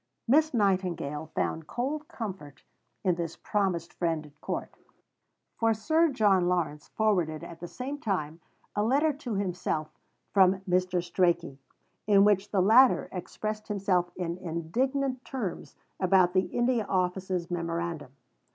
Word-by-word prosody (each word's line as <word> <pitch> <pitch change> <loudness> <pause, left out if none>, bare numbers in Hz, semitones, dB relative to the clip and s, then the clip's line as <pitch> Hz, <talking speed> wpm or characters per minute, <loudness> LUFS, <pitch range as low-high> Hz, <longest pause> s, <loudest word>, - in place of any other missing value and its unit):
Miss 305 +6 +4
Nightingale 185 - 0
found 160 -1 -1
cold 290 - -3
comfort 185 - -7 0.4
in 185 -3 +3
this 170 -1 -4
promised 185 -5 -1
friend 165 -3 -1
at 150 0 -19
court, - - -4 0.8
for 225 -1 +2
Sir 315 +10 +3
John 205 -8 +3
Lawrence 160 -4 -1
forwarded 180 -8 +1
at 165 -1 -9
the 175 - -6
same 270 +9 -5
time 170 - -2 0.4
a 205 - +1
letter 280 +8 +3
to 255 -6 -5
himself 180 -5 -2 0.4
from 190 -1 +5
Mr. 180 -2 0
Strachey, 175 -6 0 0.5
in 200 -1 +6
which 205 -1 +3
the 195 - +2
latter 235 +7 +5
expressed 215 +4 -5
himself 190 -4 +1
in 175 -1 -3
indignant 255 - -1
terms 225 -10 -5 0.2
about 185 -1 +4
the 185 0 +3
India 240 -1 +1
Office's 185 -1 -1
memorandum. 170 -4 -3
185 Hz, 135 wpm, -28 LUFS, 170-220 Hz, 0.8 s, in